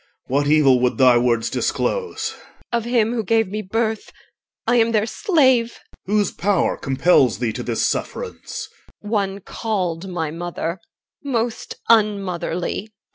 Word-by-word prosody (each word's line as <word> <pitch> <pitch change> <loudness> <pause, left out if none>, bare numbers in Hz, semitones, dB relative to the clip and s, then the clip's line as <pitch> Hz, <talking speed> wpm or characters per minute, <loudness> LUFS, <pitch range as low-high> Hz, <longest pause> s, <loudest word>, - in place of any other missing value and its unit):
What 140 +2 0
evil 145 -4 +5
would 125 0 +1
thy 125 -3 +6
words 120 -2 +1
disclose? 445 -2 -2 0.4
EL. 235 - +3
Of 230 - -8
him 235 -2 +2
who 230 -2 -1
gave 225 0 +2
me 210 +2 -3
birth. 220 +2 -2 0.5
I 240 +2 +3
am 230 0 +3
their 215 -1 +2
slave. 260 - +2 0.3
OR. 205 - 0
Whose 205 -3 +2
power 195 0 +1
compels 135 - +3
thee 115 -1 -1
to 125 - -5
this 120 -2 -1
sufferance? 475 -3 -4 0.4
EL. - - -6
One 200 -2 -1
called 190 -5 -3
my 165 -4 -3
mother, 170 +1 -4 0.4
most 240 -4 -2
unmotherly. 200 -3 +1
200 Hz, 145 wpm, -21 LUFS, 160-230 Hz, 0.5 s, thy